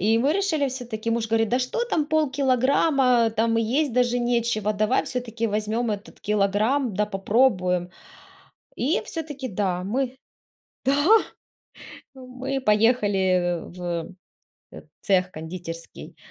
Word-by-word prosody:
И 220 +4 +3
мы 275 +5 +2
решили, 320 -7 0
всё-таки, 235 -3 -4
муж 230 0 0
говорит: 225 0 +1
"Да 250 +3 +1
что 260 - -1
там 325 -10 0
полкилограмма, 265 -4 +2
там 225 +1 +1
и - - +2
есть 265 +4 0
даже 245 0 +2
нечего, 235 -3 0
давай 215 +4 +1
всё-таки 230 -2 -3
возьмем 215 +2 -1
этот 205 +2 -6
килограмм, 210 +5 +1
да 210 +2 +1
попробуем". 195 -4 +1 0.9
И 305 - 0
всё-таки 290 -5 -5
да, 185 -3 -1
мы 255 +5 -2 2.0
Да, 265 - -13
мы 260 +2 -4
поехали 200 -6 +2
в, 180 +1 -12 0.9
э, - - -12
э, - - -9 0.2
цех 185 -2 +2
кондитерский 165 +1 -8
230 Hz, 125 wpm, -24 LUFS, 205-260 Hz, 2.0 s, И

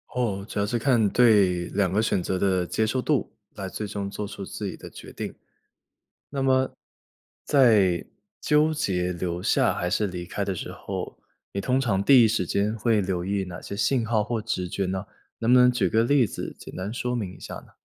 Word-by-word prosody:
哦， 105 -6 -1
主 105 - -4
要 100 - +2
是 120 +3 -1
看 115 -5 +3
对 100 -7 +4
2 95 -2 0
个 105 +3 +2
选 100 -5 0
择 95 +1 -1
的 95 -2 +1
接 110 +5 0
受 130 +4 0
度， 145 0 0 0.2
来 95 - -5
最 105 +3 -5
终 100 -1 -4
做 105 +1 -5
出 100 -1 -7
自 105 - -6
己 95 - -5
的 - - -10
决 - - -11
定。 - - -6 1.0
那 140 -1 -2
么 130 0 +2 0.7
在 105 - +4 0.4
纠 150 +1 +3
结 90 -11 -1
留 85 0 -3
下 - - +2
还 90 - -2
是 105 - +1
离 90 -2 -5
开 100 +3 -3
的 100 -1 -2
时 - - -6
候， - - -6 0.3
你 100 - -2
通 125 +6 +1
常 105 -7 +1
第 130 +1 +7
一 - - +4
时 105 -4 0
间 100 +5 0
会 110 -1 +2
留 90 -2 -2
意 100 +1 -1
哪 90 -2 -8
些 100 - -7
信 115 +4 +1
号 110 -2 +1
或 115 +1 -2
直 105 -4 -2
觉 95 +2 -2
呢？ 95 +1 -3 0.3
能 115 +1 +2
不 125 - +8
能 125 0 +6
举 100 -8 0
个 110 - +3
例 130 0 +3
子 - - -6
简 - - -10
单 95 +3 -4
说 125 +1 -2
明 100 -7 -3
一 - - -18
下 - - -8
呢？ - - -13
105 Hz, 230 characters per minute, -25 LUFS, 95-120 Hz, 1.0 s, 不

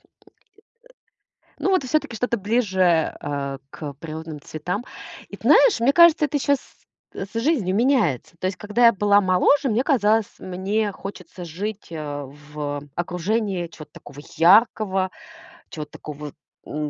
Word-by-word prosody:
Э, - - -40
э, - - -31 1.5
ну 390 - 0
вот 370 -8 +2
и - - -5
всё-таки 255 -4 -1
что-то 235 +1 -1
ближе, 190 -6 +1
а, 140 -1 -4
к 145 -2 -7
природным 155 +1 -8
цветам. 180 - -5 0.4
И - - -9
т - - -21
знаешь, 470 - +6
мне 255 +4 +4
кажется, 340 -2 +6
это 290 +1 -1
щас, 280 0 +1 0.6
а, - - -4
с - - -26
жизнью 235 - +1
меняется. 220 - +1
То 185 - -2
есть, 185 -1 -2
когда 210 +4 +2
я 230 - +7
была 205 0 +3
моложе, 190 +10 +3
мне 230 +1 +1
казалось, 220 -5 +3
мне 195 +3 -2
хочется 185 -2 -9
жить, 195 +6 -6
а, 145 -3 -5
в, 145 +1 -6
э, 145 - -16
окружении 180 +2 -2
чего-то 155 -2 -13
такого 145 0 -12 0.2
яркого, 190 +1 +4 0.6
чего-то 155 -2 -7
такого, 150 -1 -8 0.3
м, 150 0 -4
190 Hz, 155 wpm, -23 LUFS, 155-225 Hz, 1.5 s, я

